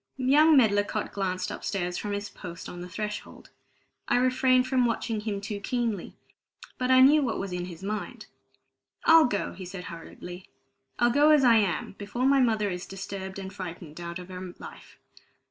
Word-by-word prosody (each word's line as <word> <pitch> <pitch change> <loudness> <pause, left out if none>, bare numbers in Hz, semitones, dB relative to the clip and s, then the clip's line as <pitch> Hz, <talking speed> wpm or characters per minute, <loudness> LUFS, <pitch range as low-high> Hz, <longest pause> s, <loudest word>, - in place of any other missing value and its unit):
Young 290 +4 +5
Medlicott 205 -3 +2
glanced 185 -2 -2
upstairs 180 -3 -3
from 205 +2 -3
his 205 0 -3
post 175 -4 -9
on 175 - -8
the 180 - -8
threshold. 210 +2 -6 0.6
I 245 - +3
refrained 255 0 +3
from 255 -2 +2
watching 230 -1 -2
him 210 -2 -3
too 205 0 -5
keenly, 225 -3 -2 0.6
but 255 0 0
I 260 0 +7
knew 295 +3 +7
what 245 -5 -1
was 195 -2 -4
in 175 0 -3
his 175 0 -10
mind. 210 +1 -5 0.8
"I'll 325 -1 +8
go," 205 -5 -2
he 190 - -9
said 180 0 -7
hurriedly. 175 +2 -10 0.5
"I'll 240 0 +3
go 290 +4 +5
as 300 -3 +6
I 235 -3 +6
am, 200 -5 0
before 210 +5 -2
my 275 0 +5
mother 220 -5 +2
is 180 0 -5
disturbed 195 0 -6
and 190 -1 -7
frightened 175 -4 -8
out 170 0 -5
of 180 0 -10
her 185 -1 -8
life. - - -12
205 Hz, 180 wpm, -27 LUFS, 185-250 Hz, 0.8 s, I'll